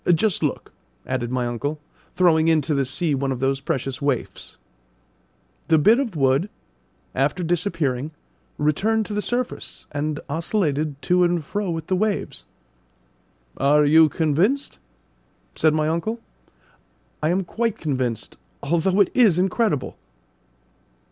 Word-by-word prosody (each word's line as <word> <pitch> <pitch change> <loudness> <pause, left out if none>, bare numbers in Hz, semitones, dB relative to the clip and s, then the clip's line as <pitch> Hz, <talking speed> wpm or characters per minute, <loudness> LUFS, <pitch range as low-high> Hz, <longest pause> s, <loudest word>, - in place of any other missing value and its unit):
Just 175 +3 +1
look," - - -3 0.3
added 130 -2 -2
my 125 0 -1
uncle, 140 +6 -3 0.4
throwing 165 -3 +4
into 160 -2 +2
the 140 -1 +1
sea 150 +4 -1
one 135 0 -1
of 130 - -3
those 135 +1 0
precious 135 -2 -3
waifs. 140 -4 -3 1.1
The 160 - +5
bit 215 - +5
of 235 -10 -2
wood, 135 +6 +2 0.6
after 180 - 0
disappearing, 160 -6 -1 0.5
returned 210 +10 +1
to 210 - -6
the 210 - -1
surface 245 +3 -4
and 145 +1 -2
oscillated 155 -3 -1
to 180 0 +3
and 175 -3 +1
fro 205 +4 -3
with 165 -2 -3
the 185 - 0
waves. 200 - -2 1.1
"Are 145 +2 +4
you 160 +2 +6
convinced?" 170 - 0 0.7
said 155 -1 +2
my 155 -1 +1
uncle. 170 +9 -2 1.0
"I 155 - +1
am 185 +3 +1
quite 225 +4 -2
convinced, 130 -7 -3 0.3
although 170 +6 +2
it 195 - +3
is 220 -9 +4
incredible!" 190 - 0
160 Hz, 130 wpm, -23 LUFS, 140-190 Hz, 1.1 s, you